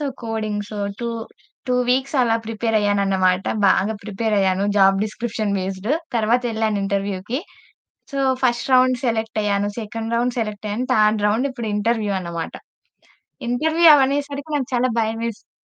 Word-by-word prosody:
So -, -, -2 dB, 0.2 s
coding. 220 Hz, -2 st, -2 dB, 0.4 s
Two 235 Hz, -, -2 dB, 0.6 s
two 250 Hz, -, +2 dB, 0.2 s
weeks 265 Hz, +3 st, 0 dB
అలా 230 Hz, -2 st, +2 dB
prepare 225 Hz, 0 st, -2 dB
అయ్యాను 205 Hz, -1 st, +1 dB
అన్నమాట. 185 Hz, -1 st, +2 dB, 0.2 s
బాగా 195 Hz, +3 st, +3 dB
ప్రిపేర్ 215 Hz, +1 st, -1 dB
అయ్యాను. 190 Hz, 0 st, +2 dB
జాబ్ 195 Hz, 0 st, +5 dB
డిస్క్రిప్షన్ 215 Hz, -1 st, -3 dB
బేస్డ్ 190 Hz, +3 st, -4 dB, 0.3 s
తరువాతెళ్ళాను 225 Hz, -2 st, +1 dB
ఇంటర్వ్యూకి. 200 Hz, +4 st, -2 dB, 0.7 s
సో, 275 Hz, -, -2 dB, 0.2 s
ఫస్ట్ 245 Hz, +1 st, +1 dB
రౌండ్ 255 Hz, 0 st, +5 dB
సెలెక్ట్ 225 Hz, -2 st, -1 dB
అయ్యాను. 205 Hz, 0 st, 0 dB
సెకండ్ 225 Hz, +1 st, -5 dB
రౌండ్ 245 Hz, +1 st, 0 dB
సెలెక్ట్ 215 Hz, -2 st, -3 dB
అయ్యాను. 225 Hz, +5 st, -2 dB
థర్డ్ 215 Hz, -1 st, +3 dB
రౌండ్ 225 Hz, +7 st, +1 dB
ఇప్పుడు 240 Hz, -4 st, -5 dB
ఇంటర్వ్యూ 215 Hz, -1 st, 0 dB
అన్నమాట. 170 Hz, -2 st, -5 dB, 1.0 s
ఇంటర్వ్యూ 320 Hz, +7 st, +3 dB
అవనేసరికి 280 Hz, +1 st, 0 dB
నాకు 270 Hz, -4 st, -1 dB
చాలా 250 Hz, +1 st, +2 dB
భయమేసింది. 225 Hz, 0 st, -3 dB
220 Hz, 140 wpm, -21 LUFS, 205-245 Hz, 1.0 s, జాబ్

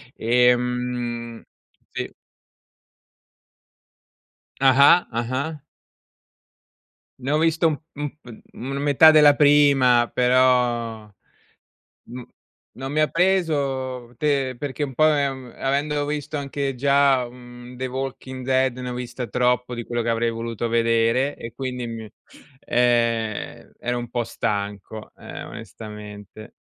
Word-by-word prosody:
Ehm 125 Hz, -1 st, 0 dB, 0.5 s
sì. -, -, -4 dB, 2.5 s
Ah-ah. 140 Hz, +6 st, +6 dB
Ah-ah. 130 Hz, +7 st, -3 dB, 1.6 s
Ne 135 Hz, +3 st, -2 dB
ho 150 Hz, -, +3 dB
visto 165 Hz, +1 st, +2 dB
u -, -, +2 dB, 0.2 s
u -, -, -11 dB
mhmm, 140 Hz, -6 st, -8 dB, 0.3 s
una 140 Hz, -, -3 dB
metà 145 Hz, +2 st, +6 dB
della 150 Hz, -2 st, +6 dB
prima, 140 Hz, -5 st, +4 dB
però, 125 Hz, -3 st, +2 dB, 1.0 s
n 125 Hz, 0 st, -8 dB, 0.5 s
non 135 Hz, +1 st, -5 dB
mi 155 Hz, -, +1 dB
ha 155 Hz, -, +3 dB
preso, 140 Hz, -9 st, 0 dB
te 135 Hz, -3 st, 0 dB
perché 145 Hz, +2 st, -3 dB
un 135 Hz, -3 st, -7 dB
po', 155 Hz, -, +3 dB
ehm, 135 Hz, -4 st, -2 dB
avendo 145 Hz, +2 st, 0 dB
visto 150 Hz, 0 st, -3 dB
anche 140 Hz, -1 st, -3 dB
già, 140 Hz, -1 st, +3 dB
uhm, 120 Hz, 0 st, -13 dB
The 130 Hz, +1 st, -3 dB
Walking 130 Hz, 0 st, -6 dB
Dead, 130 Hz, -1 st, +2 dB
ne 125 Hz, 0 st, -5 dB
ho 125 Hz, -, -4 dB
vista 125 Hz, 0 st, -5 dB
troppo 125 Hz, +2 st, 0 dB
di 120 Hz, -1 st, -5 dB
quello 120 Hz, -1 st, -3 dB
che 115 Hz, -, -2 dB
avrei 115 Hz, 0 st, +1 dB
voluto 115 Hz, 0 st, -4 dB
vedere, 115 Hz, +4 st, +2 dB
e 115 Hz, -, -8 dB
quindi 125 Hz, -2 st, -5 dB
mi 110 Hz, -2 st, -7 dB, 0.5 s
ehm, 115 Hz, -3 st, 0 dB
ero 120 Hz, 0 st, -2 dB
un 120 Hz, -1 st, -6 dB
po' 120 Hz, -1 st, -2 dB
stanco, 105 Hz, +1 st, -4 dB
eh, -, -, -9 dB
onestamente. 105 Hz, 0 st, -10 dB
125 Hz, 120 wpm, -23 LUFS, 120-140 Hz, 2.5 s, Ah-ah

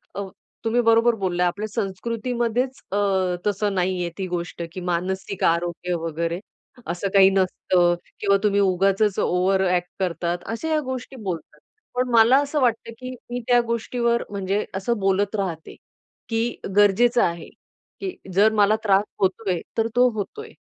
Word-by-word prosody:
अ, 200 Hz, -, -3 dB, 0.4 s
तुम्ही 240 Hz, +2 st, +2 dB
बरोबर 230 Hz, +1 st, +5 dB
बोलला. 180 Hz, -1 st, +1 dB
आपल्या 205 Hz, +5 st, -3 dB
संस्कृतीमध्येच 235 Hz, +4 st, -2 dB
अ, 200 Hz, -, 0 dB, 0.5 s
तसं 205 Hz, 0 st, 0 dB
नाही 185 Hz, 0 st, 0 dB
आहे 170 Hz, -, -2 dB
ती 190 Hz, -1 st, -3 dB
गोष्ट, 175 Hz, -1 st, -4 dB
की 185 Hz, -, -5 dB
मानसिक 190 Hz, +2 st, -2 dB
आरोग्य 175 Hz, +1 st, 0 dB
वगैरे, 165 Hz, +2 st, -2 dB, 0.5 s
असं 175 Hz, +3 st, -2 dB
काही 195 Hz, -1 st, +7 dB
नसतं 185 Hz, -2 st, +2 dB, 0.3 s
किंवा 200 Hz, -1 st, +3 dB
तुम्ही 200 Hz, -1 st, +3 dB
उगाचच 195 Hz, +2 st, +2 dB
ओव्हर 190 Hz, +2 st, +2 dB
अ‍ॅक्ट 180 Hz, 0 st, 0 dB
करतात, 175 Hz, -1 st, -1 dB
अशा 230 Hz, +8 st, -4 dB
ह्या 310 Hz, -1 st, +2 dB
गोष्टी 260 Hz, -1 st, -6 dB
बोलतात. 175 Hz, -4 st, -5 dB, 0.4 s
पण 250 Hz, 0 st, 0 dB
मला 230 Hz, +3 st, +6 dB
असं 290 Hz, 0 st, -1 dB
वाटतं, 230 Hz, -1 st, +1 dB
की 255 Hz, 0 st, -6 dB, 0.2 s
मी 245 Hz, -, -2 dB
त्या 245 Hz, -1 st, +5 dB
गोष्टीवर, 235 Hz, +1 st, 0 dB
म्हणजे 200 Hz, 0 st, -1 dB
असं 230 Hz, +5 st, -1 dB
बोलत 195 Hz, +1 st, +1 dB
राहते, 180 Hz, -6 st, -4 dB, 0.5 s
की 230 Hz, +1 st, -1 dB, 0.2 s
गरजेचं 220 Hz, +4 st, +4 dB
आहे, 170 Hz, -1 st, -2 dB, 0.5 s
की 380 Hz, -2 st, -4 dB, 0.2 s
जर 205 Hz, +4 st, +5 dB
मला 210 Hz, +1 st, +4 dB
त्रास 200 Hz, -2 st, +4 dB, 0.2 s
होतोय, 190 Hz, -1 st, 0 dB, 0.2 s
तर 225 Hz, 0 st, +2 dB
तो 250 Hz, 0 st, +6 dB
होतोय. 320 Hz, -, -5 dB
200 Hz, 150 wpm, -23 LUFS, 185-235 Hz, 0.5 s, काही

